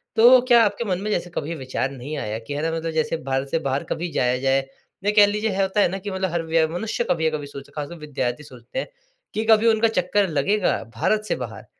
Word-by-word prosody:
तो 245 Hz, +3 st, +8 dB
क्या 235 Hz, -2 st, +7 dB
आपके -, -, -1 dB
मन 180 Hz, 0 st, 0 dB
में 210 Hz, -, -3 dB
जैसे 175 Hz, -2 st, -1 dB
कभी 165 Hz, +3 st, -3 dB
विचार 130 Hz, -2 st, -2 dB
नहीं 140 Hz, +3 st, -6 dB
आया 105 Hz, +1 st, -3 dB
कि 115 Hz, +5 st, -7 dB
है 145 Hz, -, -2 dB
ना 165 Hz, +1 st, 0 dB
मतलब 165 Hz, 0 st, -3 dB
जैसे 160 Hz, +1 st, 0 dB
भारत 135 Hz, 0 st, -1 dB
से 165 Hz, -, 0 dB
बाहर 135 Hz, -2 st, -1 dB
कभी 175 Hz, +1 st, -2 dB
जाया 125 Hz, -2 st, +1 dB
जाए? 135 Hz, 0 st, +2 dB, 0.4 s
नहीं 205 Hz, +1 st, +1 dB
कह 210 Hz, -1 st, +8 dB
लीजिए 210 Hz, 0 st, -1 dB
होता 195 Hz, +2 st, +1 dB
है -, -, +5 dB
ना 190 Hz, -, -3 dB
कि 205 Hz, +1 st, -6 dB
मतलब 190 Hz, -1 st, -1 dB
हर 170 Hz, -, 0 dB
व्य 160 Hz, 0 st, +3 dB
मनुष्य 215 Hz, +8 st, -2 dB
कभी 160 Hz, -2 st, +1 dB
अ, -, -, -9 dB
कभी 145 Hz, -, -7 dB
सोच 140 Hz, -1 st, -10 dB
खासकर 150 Hz, +3 st, -5 dB
विद्यार्थी 145 Hz, -3 st, -3 dB
सोचते 125 Hz, -, -8 dB
हैं -, -, -4 dB, 0.5 s
कि 220 Hz, +1 st, -1 dB
कभी 220 Hz, +1 st, +5 dB
उनका 225 Hz, 0 st, +4 dB
चक्कर 195 Hz, -1 st, +1 dB
लगेगा 180 Hz, +7 st, +1 dB
भारत 215 Hz, -, +1 dB
से -, -, 0 dB
बाहर। -, -, -7 dB
165 Hz, 245 wpm, -23 LUFS, 140-210 Hz, 0.5 s, तो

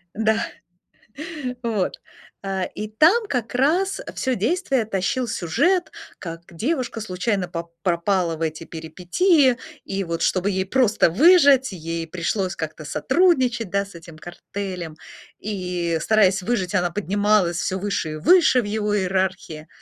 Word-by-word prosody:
Да. 220 Hz, +1 st, +1 dB, 1.2 s
Вот. 215 Hz, -5 st, -1 dB, 0.5 s
Э, 190 Hz, -2 st, -2 dB
и 215 Hz, -, -4 dB
там 330 Hz, -, +4 dB
как 245 Hz, -, -3 dB
раз, 340 Hz, +10 st, +2 dB
э, -, -, -7 dB
всё 260 Hz, -1 st, -1 dB
действие 265 Hz, -, 0 dB
тащил 220 Hz, +5 st, -1 dB
сюжет: 285 Hz, -, +1 dB, 0.3 s
как 165 Hz, -2 st, -7 dB
девушка 250 Hz, -, -2 dB
случайно 190 Hz, -1 st, -1 dB
пап 170 Hz, -1 st, -6 dB
пропала 175 Hz, 0 st, +1 dB
в 160 Hz, -, -12 dB
эти 160 Hz, 0 st, -3 dB
перипетии, 215 Hz, -, +2 dB, 0.3 s
и 195 Hz, 0 st, -2 dB
вот, 170 Hz, -1 st, -4 dB
чтобы 190 Hz, +2 st, +1 dB
ей 190 Hz, 0 st, -1 dB
просто 220 Hz, -3 st, +3 dB
выжить, 280 Hz, -, +5 dB
ей 165 Hz, -2 st, -5 dB
пришлось 185 Hz, +3 st, -2 dB
как-то -, -, -6 dB
сотрудничать, 260 Hz, -, +2 dB
да, 200 Hz, +2 st, 0 dB
с 195 Hz, -, -15 dB
этим 165 Hz, -1 st, -12 dB
картелем. 175 Hz, -1 st, -7 dB, 0.4 s
И, 180 Hz, -5 st, -2 dB
стараясь 195 Hz, -2 st, +3 dB
выжить, 200 Hz, -3 st, -1 dB
она 175 Hz, -2 st, +1 dB
поднималась 205 Hz, -2 st, +1 dB
всё 185 Hz, +2 st, -2 dB
выше 200 Hz, -5 st, -2 dB
и -, -, -5 dB
выше 315 Hz, -, +5 dB
в -, -, -7 dB
его 210 Hz, 0 st, -1 dB
иерархии. 185 Hz, -4 st, -2 dB
195 Hz, 140 wpm, -22 LUFS, 175-240 Hz, 1.2 s, выжить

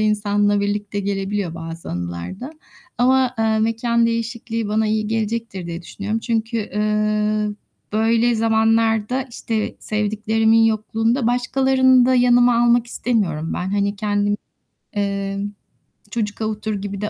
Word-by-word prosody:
insanla 205 Hz, -1 st, +2 dB
birlikte 205 Hz, 0 st, -2 dB
gelebiliyor 195 Hz, -2 st, -2 dB
bazı 165 Hz, 0 st, -7 dB
anılar 85 Hz, -, -5 dB
da 265 Hz, +5 st, -7 dB, 0.5 s
ama, 255 Hz, 0 st, +3 dB
eee, 220 Hz, 0 st, +2 dB
mekân 230 Hz, +1 st, +1 dB
değişikliği 230 Hz, -1 st, -3 dB
bana 215 Hz, +1 st, +1 dB
iyi 215 Hz, 0 st, 0 dB
gelecektir 220 Hz, -3 st, -3 dB
diye 170 Hz, 0 st, -6 dB
düşünüyorum. 205 Hz, +5 st, -4 dB
Çünkü, 225 Hz, 0 st, -1 dB
eee, 210 Hz, 0 st, 0 dB, 0.4 s
böyle 230 Hz, +2 st, +2 dB
zamanlarda 225 Hz, +2 st, +2 dB
işte 225 Hz, -2 st, -3 dB
sevdiklerimin 220 Hz, +1 st, +2 dB
yokluğunda 225 Hz, +3 st, +1 dB
başkalarını 260 Hz, +1 st, +3 dB
da 260 Hz, -, +3 dB
yanıma 245 Hz, -1 st, +4 dB
almak 240 Hz, 0 st, +3 dB
istemiyorum 190 Hz, -11 st, -1 dB
ben. 185 Hz, +1 st, -3 dB
Hani 200 Hz, 0 st, 0 dB
kendim, 205 Hz, 0 st, 0 dB, 0.6 s
eee, 200 Hz, -1 st, -2 dB, 0.7 s
çocuk 210 Hz, -1 st, -3 dB
avutur 215 Hz, 0 st, -2 dB
gibi 200 Hz, 0 st, -5 dB
de 210 Hz, -, -2 dB
215 Hz, 125 wpm, -21 LUFS, 205-230 Hz, 0.7 s, yanıma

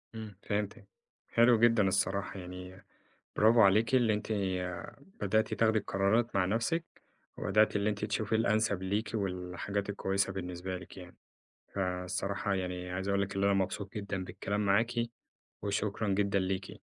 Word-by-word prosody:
إمم 110 Hz, -3 st, -7 dB
فهمتِك، 100 Hz, -1 st, -3 dB, 0.4 s
حلو 115 Hz, 0 st, +5 dB
جدًا 115 Hz, -3 st, +5 dB
الصراحة 100 Hz, +1 st, 0 dB
يعني 90 Hz, +1 st, -9 dB, 0.5 s
برافو 115 Hz, +2 st, +6 dB
عليكِ 110 Hz, +5 st, +5 dB
اللي 120 Hz, -4 st, +4 dB
أنتِ 105 Hz, -, -3 dB, 0.9 s
بدأتِ 110 Hz, +2 st, +1 dB
تاخدي 110 Hz, -1 st, +3 dB
القرارات 105 Hz, +4 st, +1 dB
مع 95 Hz, -2 st, +3 dB
نَفْسِك، 115 Hz, -, 0 dB, 0.5 s
وبدأتِ 105 Hz, +2 st, +3 dB
اللي 105 Hz, +1 st, +2 dB
أنتِ 105 Hz, 0 st, -2 dB
تشوفي 110 Hz, +1 st, -1 dB
الأنسب 110 Hz, -3 st, +2 dB
ليكِ 100 Hz, +4 st, -1 dB
والحاجات 95 Hz, 0 st, -3 dB
الكويسة 100 Hz, -1 st, 0 dB
بالنسبة 90 Hz, 0 st, -4 dB
ليكِ 90 Hz, -, -12 dB
يعني، 90 Hz, -1 st, -11 dB, 0.6 s
فالصراحة 95 Hz, +2 st, -1 dB
يعني 90 Hz, -1 st, -3 dB
عايز 95 Hz, +2 st, -3 dB
أقول 100 Hz, 0 st, +2 dB
لِك 100 Hz, -, -3 dB
اللي 100 Hz, 0 st, +2 dB
أنا 100 Hz, -, +4 dB
مبسوط 95 Hz, +1 st, -1 dB
جدًا 100 Hz, -3 st, -3 dB
بالكلام 100 Hz, +2 st, -2 dB
معاكِ 110 Hz, +5 st, +3 dB, 0.7 s
وشكرًا 100 Hz, +1 st, -1 dB
جدًا 100 Hz, 0 st, +2 dB
ليكِ. 95 Hz, +1 st, -3 dB
100 Hz, 140 wpm, -31 LUFS, 95-110 Hz, 0.9 s, برافو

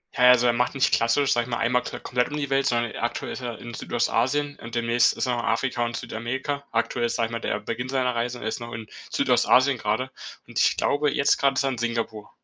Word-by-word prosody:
Ja, 125 Hz, 0 st, +6 dB
also 125 Hz, -1 st, +6 dB
er 120 Hz, -, +4 dB
macht 125 Hz, +3 st, 0 dB
nicht 135 Hz, -, +2 dB
klassisch, 115 Hz, +5 st, +3 dB
sage 120 Hz, -1 st, +1 dB
ich 125 Hz, -, -11 dB
mal, 120 Hz, -, -1 dB
einmal 125 Hz, +2 st, +2 dB
ko -, -, -6 dB
komplett 125 Hz, 0 st, -1 dB
um 150 Hz, -, -4 dB
die 140 Hz, -2 st, -3 dB
Welt, 135 Hz, 0 st, +2 dB
sondern 120 Hz, -1 st, 0 dB
aktuell 120 Hz, -, -3 dB
ist -, -, -6 dB
er 120 Hz, -3 st, -5 dB
in 120 Hz, 0 st, -8 dB
Südostasien 130 Hz, +6 st, 0 dB
und 115 Hz, +1 st, -8 dB
demnächst 115 Hz, 0 st, +3 dB
ist -, -, -2 dB
er 125 Hz, -, 0 dB
in 120 Hz, -, -1 dB
Afrika 120 Hz, +1 st, 0 dB
und 120 Hz, 0 st, -2 dB
Südamerika. 130 Hz, +7 st, -4 dB
Aktuell 120 Hz, +1 st, 0 dB
ist, 115 Hz, -, -3 dB
sage 115 Hz, -2 st, +1 dB
ich -, -, -12 dB
mal, 115 Hz, -, -3 dB
der 105 Hz, -, -1 dB
Beginn 115 Hz, +4 st, -4 dB
seiner 130 Hz, -2 st, 0 dB
Reise. 120 Hz, +1 st, -2 dB
Er -, -, -5 dB
ist 110 Hz, -, -3 dB
noch 120 Hz, 0 st, -8 dB
in 115 Hz, -1 st, -7 dB, 0.2 s
Südostasien 130 Hz, +1 st, +3 dB
grade 110 Hz, +5 st, -1 dB, 0.4 s
und -, -, -3 dB
ich -, -, +3 dB
glaube, 145 Hz, 0 st, +1 dB
jetzt 140 Hz, -, +3 dB
grad 135 Hz, -1 st, +2 dB
ist -, -, +2 dB
er 135 Hz, -, +1 dB
in 125 Hz, -, -5 dB
Singapur. 115 Hz, -3 st, -3 dB
120 Hz, 255 wpm, -25 LUFS, 115-130 Hz, 0.4 s, Ja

